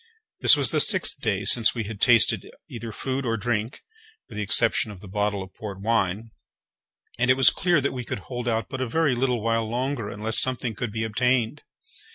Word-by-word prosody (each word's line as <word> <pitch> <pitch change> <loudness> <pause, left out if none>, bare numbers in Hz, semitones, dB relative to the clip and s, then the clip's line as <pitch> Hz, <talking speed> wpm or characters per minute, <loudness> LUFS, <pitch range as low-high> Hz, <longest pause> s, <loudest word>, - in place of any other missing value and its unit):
This - - +7
was - - +3
the - - +1
sixth 185 -8 +2
day 100 -4 -1
since 115 +1 +4
we 115 - -2
had 105 -1 -8
tasted 120 -3 +3 0.2
either 115 -1 -7
food 130 +5 -3
or 115 -2 -1
drink, 110 +3 -3 0.5
with 115 - -12
the 105 - -3
exception 110 +2 +1
of 100 -3 -10
the 100 - -12
bottle 105 0 -2
of 95 - -14
port 100 -3 -8
wine, 110 0 -1 0.9
and 125 +1 +1
it 130 - +5
was 135 - +6
clear 175 -2 +1
that 140 - -1
we 125 -1 -5
could 105 - -5
hold 120 +1 -6
out 115 -1 -1
but 130 -1 -6
a 130 - -1
very 160 +2 +1
little 125 -2 -1
while 115 -1 0
longer 125 -2 -2
unless 110 +2 0
something 125 -3 -1
could 110 +2 -4
be 110 +1 -3
obtained. 120 +1 0
115 Hz, 210 wpm, -24 LUFS, 105-125 Hz, 0.9 s, This